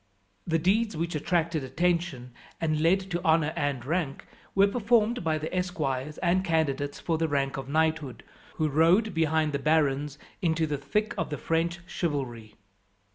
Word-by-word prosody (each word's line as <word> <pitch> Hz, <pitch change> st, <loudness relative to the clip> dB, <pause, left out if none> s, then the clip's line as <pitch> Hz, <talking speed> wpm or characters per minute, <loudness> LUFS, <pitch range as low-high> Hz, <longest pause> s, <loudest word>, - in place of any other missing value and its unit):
The 165 Hz, -1 st, +2 dB
deeds 200 Hz, +3 st, +1 dB
which 170 Hz, +2 st, -2 dB
attracted 165 Hz, 0 st, 0 dB
attention, 155 Hz, -3 st, -1 dB, 0.3 s
and 155 Hz, -2 st, 0 dB
led 180 Hz, +4 st, +4 dB
to 175 Hz, 0 st, -2 dB
honour 160 Hz, -2 st, +3 dB
and 140 Hz, -4 st, -2 dB
rank, 155 Hz, -2 st, -2 dB, 0.3 s
were 195 Hz, +1 st, +6 dB
performed 230 Hz, +1 st, +2 dB
by 160 Hz, -1 st, +1 dB
the 155 Hz, +4 st, -4 dB
esquires 150 Hz, -6 st, -2 dB
and 180 Hz, +2 st, +2 dB
candidates 145 Hz, -5 st, 0 dB
for 165 Hz, -2 st, -1 dB
the 165 Hz, -, +1 dB
rank 140 Hz, -2 st, 0 dB
of 135 Hz, -1 st, -6 dB
knighthood, 155 Hz, -4 st, 0 dB, 0.3 s
who 155 Hz, -, +1 dB
rode 170 Hz, +8 st, +3 dB
behind 160 Hz, -2 st, +1 dB
the 140 Hz, -, 0 dB
barons 150 Hz, -1 st, +1 dB, 0.2 s
into 160 Hz, -2 st, +1 dB
the 145 Hz, -2 st, -3 dB
thick 210 Hz, +11 st, -1 dB
of 165 Hz, -, -1 dB
the 150 Hz, -, -3 dB
French 170 Hz, +1 st, -1 dB
chivalry. 125 Hz, -, -4 dB
160 Hz, 160 wpm, -28 LUFS, 145-175 Hz, 0.3 s, were